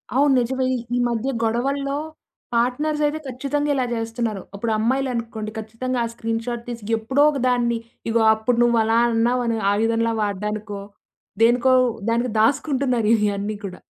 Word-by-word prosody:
అవును. 280 Hz, +1 st, +4 dB
నిజమే 260 Hz, +2 st, 0 dB
ఈ -, -, -1 dB, 0.2 s
ఈ -, -, +1 dB
మధ్య 235 Hz, +3 st, -1 dB
గొడవల్లో 275 Hz, +5 st, 0 dB, 0.6 s
పార్ట్‌నర్స్ 255 Hz, +6 st, 0 dB
అయితే 300 Hz, +1 st, -1 dB
ఖచ్చితంగా 280 Hz, +3 st, -2 dB
ఇలా 255 Hz, -2 st, +1 dB
జేస్తున్నారు. 225 Hz, -2 st, -3 dB
అప్పుడు 220 Hz, +3 st, -2 dB
అమ్మాయిలనుకోండి 230 Hz, -2 st, -1 dB
ఖచ్చితంగా 240 Hz, +3 st, -3 dB
ఆ -, -, -2 dB
స్క్రీన్‌షాట్ 230 Hz, +1 st, -3 dB
తీసి 230 Hz, -2 st, -6 dB
ఎప్పుడో 260 Hz, +6 st, 0 dB
ఒక 280 Hz, -, -3 dB
దాన్ని 240 Hz, -1 st, +1 dB, 0.3 s
ఇగో 225 Hz, 0 st, +2 dB
అప్పుడు 230 Hz, +2 st, 0 dB
నువ్వలా 230 Hz, -1 st, +3 dB
అన్నావు 240 Hz, +2 st, +1 dB, 0.3 s
ఆయుధంలా 230 Hz, +2 st, +1 dB
వాడ్డానికో, 210 Hz, 0 st, -3 dB, 0.6 s
దేనికో 245 Hz, +2 st, +4 dB, 0.4 s
దానికి 235 Hz, +1 st, 0 dB
దాసుకుంటున్నారు 255 Hz, -2 st, +1 dB
ఇయన్నీ 205 Hz, 0 st, -1 dB
కూడా. 185 Hz, -2 st, -8 dB
235 Hz, 135 wpm, -22 LUFS, 225-260 Hz, 0.6 s, అవును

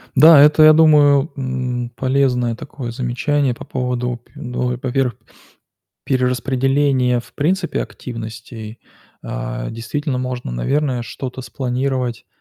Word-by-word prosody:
Да, 150 Hz, +1 st, +8 dB
это, 150 Hz, +1 st, +6 dB
я 155 Hz, 0 st, +9 dB
думаю, 150 Hz, -2 st, +5 dB
м, 125 Hz, -2 st, -3 dB
полезное 130 Hz, -3 st, +1 dB
такое 120 Hz, -1 st, -7 dB
замечание 130 Hz, +2 st, 0 dB
по -, -, -10 dB
поводу 125 Hz, -1 st, -2 dB
пю 150 Hz, -, -14 dB
ну 125 Hz, -1 st, -2 dB
и -, -, -4 dB
во-первых, 130 Hz, -3 st, 0 dB, 0.9 s
перераспределения, 130 Hz, 0 st, +1 dB
в -, -, -18 dB
принципе, 175 Hz, +4 st, 0 dB
активностей. 115 Hz, -1 st, -8 dB, 0.5 s
А -, -, -4 dB
действительно 130 Hz, +4 st, -3 dB
можно, 125 Hz, -, -4 dB
наверное, 125 Hz, -, -1 dB
что-то 130 Hz, +2 st, -6 dB
спланировать, 125 Hz, -2 st, -3 dB
125 Hz, 115 wpm, -19 LUFS, 120-140 Hz, 0.9 s, я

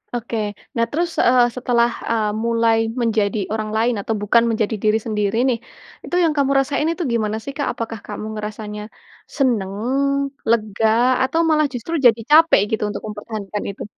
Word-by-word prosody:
Oke 235 Hz, -1 st, -3 dB, 0.4 s
nah 230 Hz, -1 st, +2 dB
terus, 340 Hz, +3 st, 0 dB
eee, 245 Hz, 0 st, +5 dB
setelah, 240 Hz, -2 st, +2 dB, 0.2 s
eee, 215 Hz, -2 st, +1 dB
mulai 230 Hz, -1 st, +2 dB, 0.2 s
menjadi 215 Hz, -2 st, +1 dB
orang 215 Hz, -1 st, -2 dB
lain 235 Hz, +2 st, +2 dB
atau 220 Hz, +2 st, -2 dB
bukan 230 Hz, +3 st, +4 dB
menjadi 220 Hz, -1 st, 0 dB
diri 215 Hz, +1 st, +3 dB
sendiri 210 Hz, -1 st, -1 dB
nih, 250 Hz, -3 st, +1 dB, 0.5 s
itu -, -, -3 dB
yang 330 Hz, -, +3 dB
kamu 275 Hz, -1 st, +2 dB
rasain 285 Hz, +3 st, 0 dB
itu 335 Hz, +2 st, -1 dB
gimana 215 Hz, -2 st, 0 dB
sih, 275 Hz, -, -5 dB
Kak? 285 Hz, -, -1 dB
Apakah 225 Hz, -1 st, -5 dB
kamu 210 Hz, 0 st, -6 dB
ngerasanya, 210 Hz, 0 st, -6 dB, 0.6 s
senang, 230 Hz, -9 st, +1 dB, 0.8 s
lega, 220 Hz, -1 st, +1 dB, 0.4 s
atau 270 Hz, +5 st, 0 dB
malah 305 Hz, -1 st, +3 dB
justru 245 Hz, +7 st, -5 dB
jadi 235 Hz, -1 st, +6 dB
capek 320 Hz, -2 st, +6 dB
gitu 220 Hz, -, 0 dB
untuk -, -, -6 dB
mempertahankan 210 Hz, -1 st, -5 dB
itu? 195 Hz, -, -8 dB
230 Hz, 165 wpm, -20 LUFS, 215-250 Hz, 0.8 s, jadi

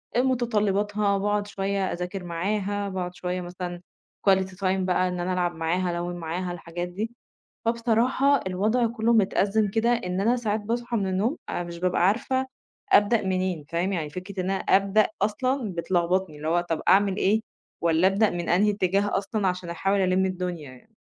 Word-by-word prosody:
آآ، 245 Hz, -, +4 dB
متطلباتها، 210 Hz, -5 st, +1 dB
وباقعد 205 Hz, +1 st, 0 dB
شوية 195 Hz, -1 st, -1 dB
أذاكر 180 Hz, +2 st, -5 dB
معاها، 200 Hz, +3 st, -2 dB
باقعد 180 Hz, -1 st, -4 dB
شوية 180 Hz, 0 st, -3 dB
مثلًا 175 Hz, 0 st, -6 dB, 0.5 s
quality 190 Hz, -1 st, +2 dB
time -, -, -19 dB, 0.2 s
بقى 185 Hz, 0 st, +1 dB
إن 180 Hz, 0 st, -3 dB
أنا 180 Hz, +1 st, -1 dB
ألعب 175 Hz, -1 st, 0 dB
معاها، 175 Hz, +3 st, 0 dB
ألوّن 175 Hz, 0 st, -3 dB
معاها، 175 Hz, +2 st, -3 dB
الحاجات 175 Hz, 0 st, -5 dB
دي. 210 Hz, +6 st, -4 dB, 0.5 s
فبصراحة 235 Hz, +4 st, +2 dB
الوضع 215 Hz, +6 st, +1 dB
كله 230 Hz, 0 st, +1 dB
متأزم 205 Hz, 0 st, +2 dB
كده، 225 Hz, +3 st, +1 dB
إن 185 Hz, -5 st, -1 dB
أنا 235 Hz, +5 st, +3 dB
ساعات 220 Hz, -3 st, -1 dB
باصحى 235 Hz, +2 st, -2 dB
من 195 Hz, -2 st, 0 dB
النوم، 200 Hz, -, 0 dB
أنا -, -, -2 dB
مش 170 Hz, 0 st, -8 dB
بابقى 180 Hz, 0 st, +2 dB
عارفة 260 Hz, +5 st, 0 dB, 0.5 s
أبدأ 210 Hz, +2 st, +5 dB
منين، 185 Hz, -4 st, -1 dB
فاهم؟ 175 Hz, +4 st, -1 dB
يعني 155 Hz, -5 st, -2 dB
فكرة 185 Hz, +3 st, -6 dB
إن 185 Hz, -, -1 dB
أنا 195 Hz, -, 0 dB
أبدأ 200 Hz, +2 st, +3 dB, 0.2 s
أصلًا 255 Hz, 0 st, 0 dB
بتلخبطني، 175 Hz, 0 st, 0 dB
اللي 155 Hz, +2 st, -5 dB
هو 175 Hz, +1 st, +3 dB
طب 165 Hz, -, -1 dB
أعمل 195 Hz, 0 st, +4 dB
إيه، 210 Hz, +2 st, +2 dB, 0.4 s
والّا 170 Hz, +2 st, +3 dB
أبدأ 200 Hz, +2 st, +2 dB
من 175 Hz, -1 st, -4 dB
أنهي 205 Hz, +4 st, +4 dB
اتجاه 200 Hz, 0 st, +1 dB
أصلًا، 200 Hz, -1 st, -1 dB
عشان 180 Hz, -1 st, -3 dB
أحاول 195 Hz, +4 st, 0 dB
ألِم 185 Hz, 0 st, +2 dB
الدنيا 180 Hz, -6 st, -4 dB
يعني. 170 Hz, -, -19 dB
190 Hz, 175 wpm, -26 LUFS, 180-210 Hz, 0.5 s, أبدأ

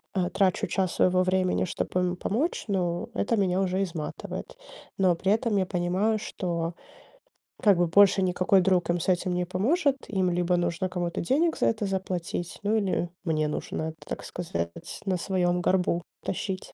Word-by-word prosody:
э, 180 Hz, -1 st, +1 dB
трачу 190 Hz, -2 st, +1 dB
час 185 Hz, -2 st, 0 dB
своего 185 Hz, 0 st, +3 dB
времени, 185 Hz, 0 st, +1 dB
чтобы 180 Hz, +1 st, -2 dB
ему 180 Hz, 0 st, 0 dB
помочь, 250 Hz, -, -1 dB
ну, 175 Hz, -4 st, -1 dB
это 230 Hz, -, +1 dB
меня 185 Hz, -2 st, +2 dB
уже 190 Hz, +1 st, 0 dB
изматывает. 165 Hz, -5 st, -6 dB, 0.4 s
Но 185 Hz, -3 st, +3 dB
при 190 Hz, +3 st, 0 dB
этом 220 Hz, -1 st, +1 dB
я 190 Hz, -, +2 dB
понимаю, 185 Hz, +4 st, 0 dB
что 170 Hz, -4 st, -3 dB, 0.9 s
как 200 Hz, -4 st, +5 dB
бы 175 Hz, 0 st, +3 dB
больше 200 Hz, +2 st, +5 dB
никакой 185 Hz, +1 st, +3 dB
друг 180 Hz, -2 st, +2 dB
им 175 Hz, 0 st, +2 dB
с 165 Hz, -, -4 dB
этим 180 Hz, 0 st, +1 dB
не 180 Hz, 0 st, 0 dB
поможет. 270 Hz, -, +1 dB
Им 190 Hz, -3 st, +1 dB
либо 175 Hz, 0 st, +1 dB
нужно 175 Hz, +2 st, -1 dB
кому-то 175 Hz, -2 st, -2 dB
денег 315 Hz, -, +2 dB
за -, -, +2 dB
это 220 Hz, -2 st, 0 dB
заплатить, 185 Hz, -3 st, -3 dB
ну, 210 Hz, +2 st, +2 dB
или 190 Hz, -4 st, 0 dB
мне 155 Hz, -3 st, +1 dB
нужно 150 Hz, -, -3 dB
это 160 Hz, 0 st, -5 dB
так -, -, -4 dB
сказать, 85 Hz, -, -3 dB, 0.3 s
на 190 Hz, -2 st, +1 dB
своём 180 Hz, -1 st, 0 dB
горбу 180 Hz, -1 st, +1 dB, 0.2 s
тащить. 190 Hz, 0 st, -4 dB
185 Hz, 170 wpm, -27 LUFS, 175-195 Hz, 0.9 s, как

